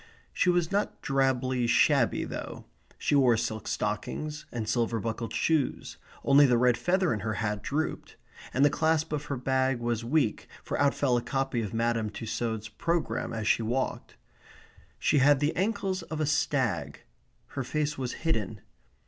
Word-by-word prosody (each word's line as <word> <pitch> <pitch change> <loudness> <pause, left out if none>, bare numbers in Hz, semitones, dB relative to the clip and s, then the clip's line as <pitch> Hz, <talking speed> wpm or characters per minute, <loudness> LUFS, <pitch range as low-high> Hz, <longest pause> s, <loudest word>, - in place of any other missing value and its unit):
She 180 - +2
was 175 -1 +2
not 200 +1 -1
drably 130 -3 +1
shabby, - - +3
though. - - -6 0.3
She - - -1
wore 130 -5 +5
silk 110 -1 -3
stockings, 150 +9 -3
and 115 -3 -4
silver 115 0 0
buckled 115 +1 -4
shoes, 160 -4 0 0.3
only 140 +1 +6
the 125 -2 +3
red 125 0 +4
feather 180 +8 +1
in 105 - -2
her 110 0 -2
hat 105 -2 -2
drooped, 150 +8 -3 0.4
and 135 +2 +3
the 145 - +4
clasp 160 0 +1
of 150 0 -2
her 140 - -3
bag 130 +1 +1
was 120 -1 -1
weak, 125 -2 0 0.2
for - - -3
out 140 -1 +3
fell 130 -4 +2
a - - 0
copy 135 0 -1
of 105 -3 -4
Madame 115 -1 0
Tussaud's 110 0 -3
programme 170 +9 -2
as 110 -2 -3
she - - +3
walked. 120 +4 -2 0.8
She 145 - +2
had 140 +1 +5
the 150 +2 0
ankles 190 -1 -1
of 160 -2 -6
a 155 - +1
stag. 125 - 0 0.5
Her 135 - -4
face 150 +3 -1
was 130 -3 -3
hidden. 110 - -1
130 Hz, 165 wpm, -28 LUFS, 115-150 Hz, 0.8 s, only